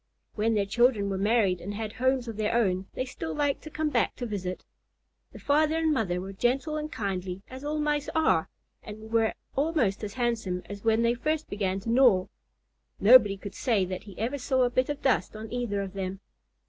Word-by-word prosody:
When 225 +1 +1
their 205 -1 +2
children 215 -1 +2
were 190 - -1
married 200 -4 +2
and 205 +3 -5
had 215 0 -4
homes 260 0 +1
of 225 - -5
their 215 +1 0
own, 190 -5 +1
they 255 - -1
still 160 -10 -5
liked 285 -1 0
to 310 - -9
come 310 0 -1
back - - +1
to 245 - -5
visit. 185 -5 -4 0.7
The - - -11
father 305 +2 +2
and 320 -1 +2
mother 185 -9 0
were 190 +2 -6
gentle 270 +9 0
and 305 0 -4
kindly, 190 -2 -4
as 260 +1 -8
all 300 +1 -2
Mice 295 -1 0
are, 320 0 +2 0.3
and 215 +1 -10
were 225 -1 +2 0.2
almost 275 -9 +1
as 205 0 -5
handsome 225 -7 -1
as 200 0 -8
when 225 0 +3
they 235 0 +3
first 305 +6 -2
began 195 -2 -1
to 230 - -3
gnaw. 235 -7 +5 0.7
Nobody 210 -3 +7
could 200 +1 -8
say 220 -7 +1
that 185 +2 -6
he 200 -4 -12
ever 250 +6 -2
saw 260 0 +1
a 245 - +1
bit 255 +2 +1
of 290 - -4
dust 240 -7 +1
on 220 +1 -7
either 235 -5 -1
of 195 -1 -7
them. 190 -1 -4
225 Hz, 210 wpm, -28 LUFS, 195-260 Hz, 0.7 s, Nobody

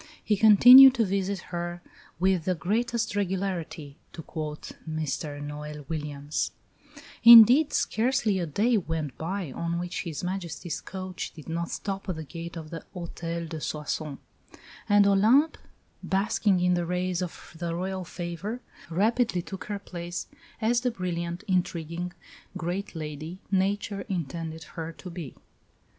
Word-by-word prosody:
"He 210 - +2
continued 245 +6 +9
to 230 - +2
visit 195 0 -1 0.2
her 175 0 -3 0.4
with 185 -2 +2
the 185 - +1
greatest 225 +4 -1
regularity," 185 -7 -3 0.2
to 165 - -8
quote 150 -1 -6 0.2
Mr 155 -1 -3
Noel 150 0 -7
Williams; 150 -2 -3 0.7
"indeed, 235 +6 +10
scarcely 225 -4 +1
a 170 - -2
day 220 +10 +2
went 160 -7 -3
by 175 -1 -3
on 170 +4 -2
which 175 +1 -3
His 165 -3 -5
Majesty's 175 -3 -4
coach 185 -1 -6
did 155 - -12
not 170 +1 -3
stop 195 -1 -4
at 185 - -1
the 160 - -6
gate 165 +4 -8
of 155 -2 -8
the 165 - -6
Hôtel 170 -1 -5
de 160 -1 -6
Soissons; 150 -1 -3 0.7
and 205 0 +6
Olympe, 225 +11 +4 0.4
basking 195 0 +1
in 180 0 +3
the 175 -1 0
rays 180 0 -1
of 175 -1 -7
the 170 -1 -2
Royal 185 +1 -3
favour, 175 +6 -5 0.3
rapidly 210 +1 +1
took 190 0 -7
her 205 -1 -3
place 175 -2 -6 0.3
as 235 +2 +2
the 250 - +1
brilliant, 175 -4 -4
intriguing 175 -2 -1 0.5
great 180 +3 -4
lady 155 +2 -6
Nature 200 +1 0
intended 165 -2 -4
her 165 +1 -7
to 180 +2 -10
be." 170 -6 -7
180 Hz, 140 wpm, -27 LUFS, 165-200 Hz, 0.7 s, indeed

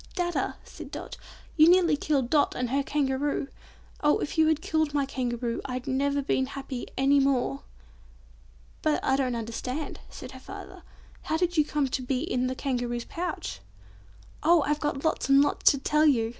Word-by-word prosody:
"Dadda," 350 -2 -1
said - - -10
Dot, - - -7 0.4
"You 315 +1 +7
nearly 350 -3 +5
killed 280 -4 0
Dot 295 -2 +3
and 250 -1 -2
her 280 +1 +2
Kangaroo! 280 0 -1 0.5
Oh 295 0 +4
if - - -4
you 315 -1 +4
killed 315 -1 -1
my 285 -1 +2
Kangaroo, 240 -3 -2
I'd 255 -1 -4
never 280 +1 0
have 285 -1 -1
been 265 -1 +1
happy 270 -2 -6
any 275 +2 +4
more!" 255 - +1 1.2
"But 310 -1 +2
I 265 - +3
don't 260 -3 0
understand," 250 +6 -4
said - - -9
her - - -10
father. - - -10 0.4
"How 315 - -1
did 350 +1 0
you 305 - +5
come 295 -1 0
to 260 - -2
be 255 0 -1
in 255 -6 0
the 260 - -2
Kangaroo's 245 -3 -2
pouch?" 335 - -4 0.8
"Oh! 330 0 +5
I've 295 +1 0
got 295 -1 -2
lots 320 - 0
and 275 0 +7
lots 290 - +4
to 280 - +2
tell 300 +3 +3
you!" 230 -6 +3
275 Hz, 180 wpm, -27 LUFS, 255-300 Hz, 1.2 s, You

